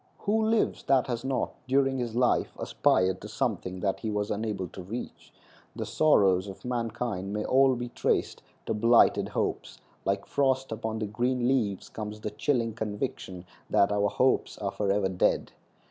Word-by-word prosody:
Who 220 +2 +1
lives 220 0 +1
that 135 -2 +3
has 120 -2 -3
not, 135 -1 -1
during 135 0 +2
his 120 -2 -3
life, 125 0 +2
aspired 95 0 +1
to 105 - -7
something 100 -6 -2
that 95 -1 0
he 110 - -3
was 105 -1 -1
unable 105 -3 -2
to 95 - -9
reach? 110 +7 -7 0.4
The - - -3
sorrows 100 -11 +3
of 95 +4 -10
mankind 115 -5 -3
may 105 0 -2
all 135 0 +4
be 120 0 -4
traced - - -1 0.2
to - - -1
blighted 115 +2 +4
hopes; - - -3 0.3
like 100 0 -1
frost 135 -2 0
upon 110 0 -3
the 110 - -2
green 120 +4 0
leaves 110 -8 0
comes 105 -1 -6
the 105 - -4
chilling 115 0 0
conviction 105 -4 -4 0.2
that 100 - +3
our 105 0 +2
hopes 125 +6 +1
are 100 -2 -3
forever 100 -1 +1
dead. 95 -1 +1
110 Hz, 165 wpm, -28 LUFS, 100-125 Hz, 0.4 s, all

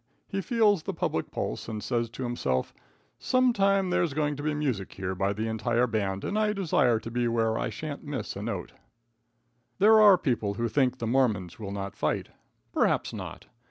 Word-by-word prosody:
He 195 -1 -2
feels 210 -4 +3
the 190 +3 -5
public 80 - -1
pulse, - - -4
and 110 -2 -5
says 120 -2 -1
to 120 +3 -6
himself: 120 - -1 0.5
"Sometime 200 -7 +2
there's 165 -5 +1
going 150 -1 0
to 145 - -6
be 150 0 -1
music 130 -10 -2
here 95 -1 -3
by 95 +2 0
the 110 +2 -2
entire 115 +2 +1
band, 100 -4 -2
and 210 - -1
I 210 -1 +2
desire 155 - +2
to 115 +1 -8
be 120 0 0
where 115 -1 +1
I - - -1
shan't 150 -2 -6
miss 145 -3 -4
a - - -5
note." - - -4 1.0
There 215 +2 +6
are 205 -3 +8
people 115 - -1
who 120 +2 -1
think 130 +1 +1
the 115 - -4
Mormons 110 -8 +1
will 105 -3 -5
not 100 0 -5
fight. - - -1 0.4
Perhaps - - +1
not. - - -7
125 Hz, 190 wpm, -28 LUFS, 110-175 Hz, 1.0 s, are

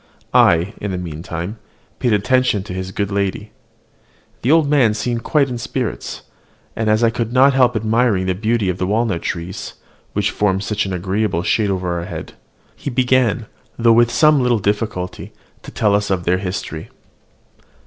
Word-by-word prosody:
I, 85 +6 +4
in 100 - -3
the 95 - -2
meantime, 85 +4 -5 0.4
paid 120 - +1
attention 115 0 +2
to 95 - -7
his 95 0 -5
good 100 +1 -2
lady. 100 +1 -2 0.9
The 125 - +2
old 160 -2 +4
man 130 -7 +3
seemed 115 +2 -2
quite 145 +2 +2
in 125 -2 -5
spirits; - - -4 0.5
and 110 -1 -1
as 110 +2 +3
I 115 - +4
could 115 0 -3
not 135 +2 +5
help 125 -2 +3
admiring 110 -3 +1
the 95 - +1
beauty 110 +2 0
of 90 0 -2
the 90 - 0
walnut 105 -4 0
trees, 90 +3 -5 0.4
which 105 0 0
formed 95 -1 0
such 105 -1 -1
an - - -4
agreeable 95 0 -1
shade 105 +1 +1
over 90 -2 -1
our 85 - -5
heads, - - -7 0.4
he - - -5
began, 125 -3 +2 0.3
though 115 -1 +4
with 120 +1 +4
some 150 +1 +4
little 125 -2 +2
difficulty, 100 -3 -3 0.3
to - - -10
tell 105 -2 +1
us 105 0 +1
their 90 -1 0
history. 90 -4 -5
105 Hz, 170 wpm, -19 LUFS, 95-120 Hz, 0.9 s, not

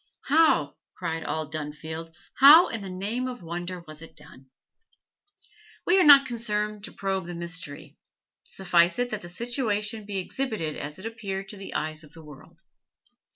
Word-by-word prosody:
How 320 +3 +3 0.2
cried 160 0 -3
all 155 -1 -3
Dunfield 155 +2 -6 0.3
how 300 +6 +9
in 230 - -2
the 195 - -7
name 205 +8 -2
of 250 -7 -7
wonder 175 +2 -5
was 155 -2 -9
it 165 - -11
done? 140 -3 -14 1.4
We 365 +2 +4
are - - +6
not 280 -3 +9
concerned 210 -4 -3
to - - -9
probe 195 -2 -3
the 175 - -6
mystery; 170 -4 -4 0.5
suffice 175 -2 +2
it 245 0 -1
that 215 -1 -3
the 175 - -8
situation 215 0 -2
be 200 -1 -3
exhibited 190 - -3
as 150 +1 -6
it 190 - -11
appeared 195 -4 -5
to 205 - -6
the 195 - -8
eyes 155 +1 -2
of 150 - -16
the 165 - -12
world. 150 -3 -15
190 Hz, 165 wpm, -26 LUFS, 165-225 Hz, 1.4 s, how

